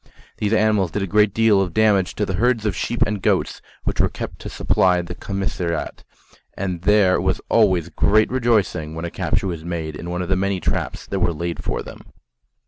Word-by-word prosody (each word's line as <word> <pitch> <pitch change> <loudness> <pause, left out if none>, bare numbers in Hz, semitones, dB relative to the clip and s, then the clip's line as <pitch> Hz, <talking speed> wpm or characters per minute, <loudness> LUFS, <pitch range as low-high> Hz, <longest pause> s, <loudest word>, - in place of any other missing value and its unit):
These 105 -1 -1
animals 110 -4 +2
did 100 +3 -2
a - - 0
great 105 +2 +3
deal 110 -2 +3
of 90 -3 -3
damage 105 -4 +3
to 105 - 0
the 95 - -3
herds 115 +3 +1
of 105 -4 0
sheep 120 +5 0
and 105 -1 -3
goats - - 0 0.2
which - - 0
were - - +2
kept - - -7
to - - -7
supply 90 -1 +2
the 85 - -7
commissariat, 90 -3 -3 0.5
and 90 -3 -3
there 100 -1 +4
was - - 0
always 95 -7 +3
great 110 +7 +2
rejoicing 105 -11 0
when 80 +1 -4
a 85 - -5
capture - - -1
was 85 -4 -4
made 80 -3 -4
in 85 +3 -7
one 90 +1 -2
of 90 - -6
the 95 - +2
many 95 0 0
traps - - -2
that 95 - -3
were 90 -1 +1
laid 85 +2 -4
for - - -2
them. - - -11
95 Hz, 210 wpm, -21 LUFS, 85-105 Hz, 0.5 s, there